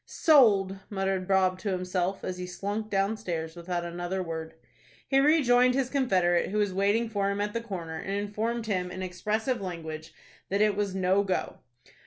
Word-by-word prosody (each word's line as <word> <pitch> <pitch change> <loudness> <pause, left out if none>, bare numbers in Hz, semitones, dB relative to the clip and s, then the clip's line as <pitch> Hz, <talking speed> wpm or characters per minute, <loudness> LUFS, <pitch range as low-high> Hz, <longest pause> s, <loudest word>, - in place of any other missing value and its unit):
"Sold!" 205 - +4
muttered 195 -2 -1
Bob 190 -1 +2
to 205 - -3
himself, 185 0 -2
as 185 0 -4
he 180 - -4
slunk 205 +4 -4
downstairs 195 -5 -2
without 175 0 -3
another 175 +2 -3
word. 160 -1 -6 0.5
He 270 - +3
rejoined 255 -4 +4
his 265 -2 0
confederate, 185 -11 +2
who 210 - -2
was 205 -2 +1
waiting 205 +5 +2
for 200 -3 -1
him 200 0 -2
at 205 0 -1
the 230 - -2
corner, 170 -8 -6
and 195 - -3
informed 215 +3 -2
him 185 -4 -1
in 185 +1 -6
expressive 210 +7 -2
language 160 -4 -6 0.4
that 200 - 0
it 210 -1 +3
was 200 -2 -1
"no 190 +1 +2
go." 190 -2 -2
195 Hz, 175 wpm, -28 LUFS, 180-215 Hz, 0.5 s, Sold